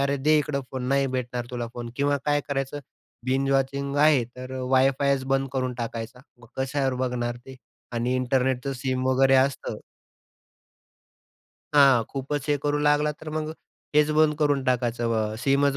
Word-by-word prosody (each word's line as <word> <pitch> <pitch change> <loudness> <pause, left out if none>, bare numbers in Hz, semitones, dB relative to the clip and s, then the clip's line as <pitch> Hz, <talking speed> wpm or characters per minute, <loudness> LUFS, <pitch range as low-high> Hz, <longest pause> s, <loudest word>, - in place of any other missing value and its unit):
अरे, 140 +1 +1
दे 155 +3 +3
इकडं 145 -1 -1
फोन, 130 -1 -4
नाही 140 0 +2
भेटणार 125 -1 -3
तुला 120 -1 -3
फोन 120 -1 -6
किंवा 145 0 +2
काय 145 0 +2
करायचं, 135 0 -2 0.5
बिंज 135 +1 +1
वॉचिंग 140 +1 0
आहे 145 -4 +5
तर 125 +2 -10 0.2
वाय-फायच 135 +1 +3
बंद 135 0 +1
करून 130 -2 -1
टाकायचा, 115 +1 -5 0.2
मग 120 - -16
कशावर 135 0 0
बघणार 120 -1 -2
ते? 130 +2 -13 0.4
आणि 120 +2 0
इंटरनेटचं 130 +1 0
सिम 130 0 -2
वगैरे 135 +1 +4
असतं 135 +1 0 2.0
हां. 135 -5 +6
खूपच 140 +1 -4
हे 145 - +3
करू 145 0 +1
लागला 150 0 +2
तर 155 - -8
मग 155 0 -3 0.4
हेच 150 0 +4
बंद 155 -1 +4
करून 145 -3 +2
टाकायचं. 120 -2 0 0.2
अ, - - -5
सीमच 140 +2 +2
135 Hz, 155 wpm, -25 LUFS, 125-140 Hz, 2.0 s, हां